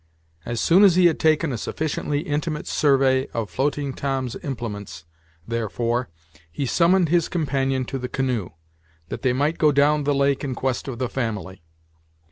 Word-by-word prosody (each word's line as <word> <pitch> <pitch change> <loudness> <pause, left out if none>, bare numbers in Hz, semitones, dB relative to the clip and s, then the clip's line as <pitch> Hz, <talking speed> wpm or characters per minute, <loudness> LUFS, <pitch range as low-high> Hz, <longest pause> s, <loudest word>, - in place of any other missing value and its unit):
As 120 - -2
soon 180 - +5
as 190 -4 +6
he 180 -1 +5
had 170 - +3
taken 155 -1 +2
a 115 - -3
sufficiently 150 0 -2
intimate 150 +1 -3
survey 135 -2 +2
of 115 -3 -3
floating 140 0 -1
Tom's 135 -3 -2
implements, 105 - -6 0.4
therefore, 115 +2 -1 0.4
he 140 - -3
summoned 170 +5 +3
his 170 0 +2
companion 135 -6 0
to 135 +2 -4
the 125 0 -5
canoe, 125 -8 -1 0.6
that - - -5
they 130 - +2
might 145 +6 0
go 155 -2 +5
down 145 +1 +3
the 145 0 +2
lake 140 0 +1
in 135 -3 -3
quest 130 +1 -2
of 130 -3 -5
the 130 0 -1
family. 105 -8 -4
135 Hz, 165 wpm, -23 LUFS, 120-150 Hz, 0.6 s, as